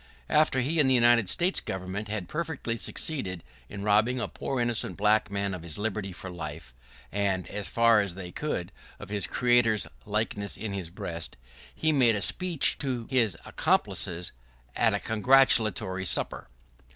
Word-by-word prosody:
After 150 -4 +3
he 155 +6 +1
and 140 -3 +5
the 130 - +4
United 120 -4 +5
States 180 +2 +2
government 95 +3 -5
had 105 -3 -4
perfectly 155 -7 -3
succeeded 100 - -2 0.3
in 100 -1 -7
robbing 110 +5 +3
a 120 - -1
poor 135 - -4
innocent 120 -1 -1
black 105 +1 +3
man 100 -1 -1
of 90 - -6
his 80 -2 -7
liberty 105 -2 -3
for 95 +1 -8
life, 75 -6 -7 0.4
and, 95 -2 0
as 100 0 -3
far 115 -2 +4
as 100 -4 -4
they 90 -2 -7
could, 90 - -3 0.3
of - - -10
his 105 -1 -2
Creator's 120 -3 +3 0.2
likeness 105 -1 -2
in 110 -3 -4
his 95 -4 -4
breast, 85 -2 -6 0.4
he 160 - +1
made 125 -6 +4
a 100 - -2
speech 180 - +2
to 125 -5 -3
his 115 -9 +2
accomplices, 85 +1 0 0.4
at - - +3
a - - -1
congratulatory 110 -5 +3
supper! - - -1
105 Hz, 165 wpm, -28 LUFS, 95-125 Hz, 0.4 s, and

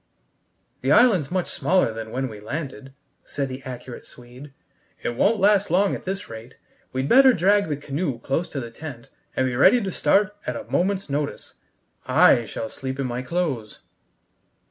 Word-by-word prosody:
"The - - 0
island's 195 - +5
much 185 -1 -1
smaller 180 -11 +1
than 110 0 -6
when 130 +3 -2
we 110 -4 -9
landed," 135 +3 -6 0.3
said 140 -2 -4
the 130 +1 -7
accurate 125 -1 -8
Swede. 125 +4 -13 0.5
"It - - 0
won't 205 - +2
last 200 0 +3
long 190 +4 +2
at - - -6
this 195 +2 -4
rate. 115 +3 -11 0.3
We'd 130 +1 -2
better 265 - +7
drag 200 0 +2
the 145 - -1
canoe 145 -1 -3
close 135 +8 -2
to 140 - -4
the 120 -3 -7
tent, 125 -2 -10 0.2
and 130 - +1
be 125 -1 -1
ready 195 - +6
to 195 -4 -3
start 195 +6 +2
at - - -2
a - - -5
moment's 195 +2 -1
notice. 145 0 -3 0.5
I 120 - +5
shall 110 - -5
sleep 130 +1 -6
in 135 - -1
my 125 0 -3
clothes." 130 -6 -3
140 Hz, 175 wpm, -23 LUFS, 125-185 Hz, 0.5 s, better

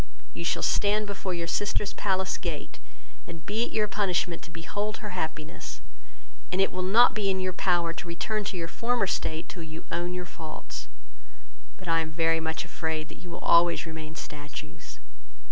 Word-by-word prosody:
You - - -4
shall 170 - +1
stand 210 +1 +3
before 195 -2 -2
your 170 -1 -1
sister's 205 +3 +1
palace 190 -1 +1
gate, 165 -7 -4 0.5
and 165 -2 -8
be 220 +3 +1
it - - -7
your 215 -1 +2
punishment 185 -4 +1
to - - -9
behold 205 +6 -3
her 210 - -5
happiness; 155 -8 -4 0.7
and 180 - +1
it 195 - +4
will 185 - -2
not 215 +7 +7
be 205 -2 +1
in 190 -1 +1
your 185 0 0
power 175 -2 +2
to 175 - -6
return 210 +5 -1
to 195 - -2
your 165 -1 -2
former 235 +4 +1
state 160 -3 -1
till 180 - -7
you 160 0 -7
own 175 +1 -1
your 180 0 -3
faults; 160 -2 -7 0.9
but 185 - -11
I 165 0 +4
am 160 -1 -1
very 165 0 +3
much 160 +1 -1
afraid 160 -2 -2
that - - -10
you 180 - -10
will - - -6
always 170 0 +6
remain 160 -1 -6
statues. 150 -3 -7
175 Hz, 185 wpm, -29 LUFS, 160-195 Hz, 0.9 s, not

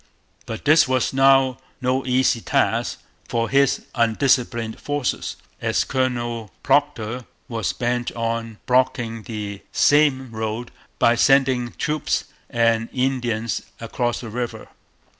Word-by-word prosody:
But 110 - -6
this 155 0 +6
was 130 0 +1
now 135 -1 +4 0.2
no 130 0 0
easy 125 -2 +2
task - - 0 0.3
for 115 0 0
his 140 -1 +2
undisciplined 115 -1 +1
forces, 145 -3 -2 0.3
as - - +1
Colonel 120 -4 -2
Procter 130 -4 +1 0.2
was 115 -5 -2
bent 120 -1 -1
on 115 -1 -3
blocking 120 -3 +1
the 105 -3 -6
same 140 -4 +3
road 110 +2 -4 0.3
by 115 - +4
sending 130 -1 +3
troops 150 -1 -1 0.3
and 115 -1 +2
Indians 120 -6 -1 0.2
across 120 +1 -2
the 115 - -7
river. 120 +2 -5
120 Hz, 115 wpm, -22 LUFS, 115-130 Hz, 0.3 s, this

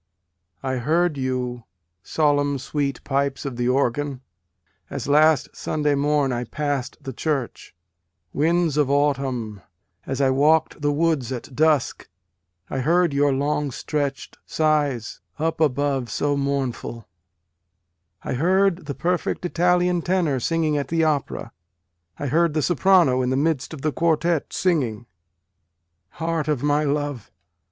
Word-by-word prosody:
I 130 -1 -1
heard 160 +6 +1
you, 125 -3 -3 0.4
solemn 145 +2 +1
sweet 140 +1 -3
pipes 140 +1 -1
of 135 -3 -4
the 120 +1 0
organ, 135 +1 0 0.7
as - - -5
last 150 -1 +3
Sunday 150 -1 0
morn 145 -1 +1
I 120 0 -2
pass 145 -1 -2
d - - -25
the 135 - -6
church, 135 - -3 0.6
Winds 165 0 +1
of 145 -3 +2
autumn, 135 -7 0 0.5
as 135 0 -3
I 135 -1 +3
walked 155 +4 +2
the 145 0 +2
woods 145 -4 0
at 130 +1 -6
dusk, 155 -3 +1 0.6
I 135 - -3
heard 170 +3 +2
your 145 0 +3
long 145 +2 0
stretch 140 +1 -3
d - - -22
sighs 145 -7 0 0.2
up 160 +1 -1
above 140 -3 +1
so 145 +6 0
mournful, 135 -5 -3 1.2
I - - -3
heard 180 +3 +2
the 140 - -4
perfect 180 +1 -1
Italian 180 0 +2
tenor 170 -7 +1
singing 155 +2 0
at 140 - -3
the 165 +1 +1
opera, 150 -3 -1 0.7
I - - -4
heard 160 +3 +2
the 155 - +1
soprano 175 -6 +4
in 125 - 0
the 130 - +1
midst 145 -2 0
of 155 -4 -8
the 155 - +1
quartet 165 0 0
singing; 125 - 0 1.1
Heart 165 -1 -1
of 150 -4 -1
my 145 +1 +2
love 145 -4 -2
145 Hz, 140 wpm, -23 LUFS, 135-160 Hz, 1.2 s, soprano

